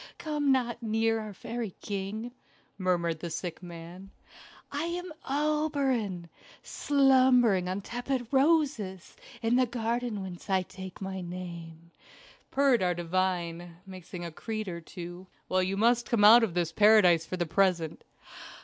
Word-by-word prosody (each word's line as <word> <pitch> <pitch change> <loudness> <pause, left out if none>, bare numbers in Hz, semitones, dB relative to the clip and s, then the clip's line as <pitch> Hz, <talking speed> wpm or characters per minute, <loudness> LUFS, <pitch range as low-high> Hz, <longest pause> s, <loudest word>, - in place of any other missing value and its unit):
Come 295 -3 0
not 245 -2 0
near 225 0 +1
our 215 -1 -6
fairy 225 +1 -6
king," 205 +4 -4 0.5
murmured 170 -3 0
the 170 - -5
sick 175 +1 -5
man. 175 +2 -10 0.6
"I 290 +3 -2
am 350 0 -4 0.2
Oberon, 275 - 0 0.4
slumbering 255 -9 +3
on 190 +2 -2
tepid 245 +3 -3
roses 270 - +1 0.3
in 230 +2 +3
the 255 -1 +3
garden 235 -2 -2
whence 185 +1 -9
I 190 -1 +2
take 190 +1 -10
my 190 -1 -4
name," 170 -2 -8 0.6
purred 270 -4 +3
our 180 -1 +1
divine, 175 -1 -2
mixing 185 -2 -8
a 170 - -6
creed 215 +5 -5
or 170 -2 -5
two. 175 +2 -9 0.2
"Well, 185 0 +2
you 190 +1 -1
must 235 +2 +2
come 225 -4 +2
out 230 +3 +9
of 190 -7 -1
this 170 -2 0
paradise 185 -5 +5
for 185 - -4
the 175 - 0
present." 175 -2 +1
195 Hz, 140 wpm, -29 LUFS, 175-245 Hz, 0.6 s, out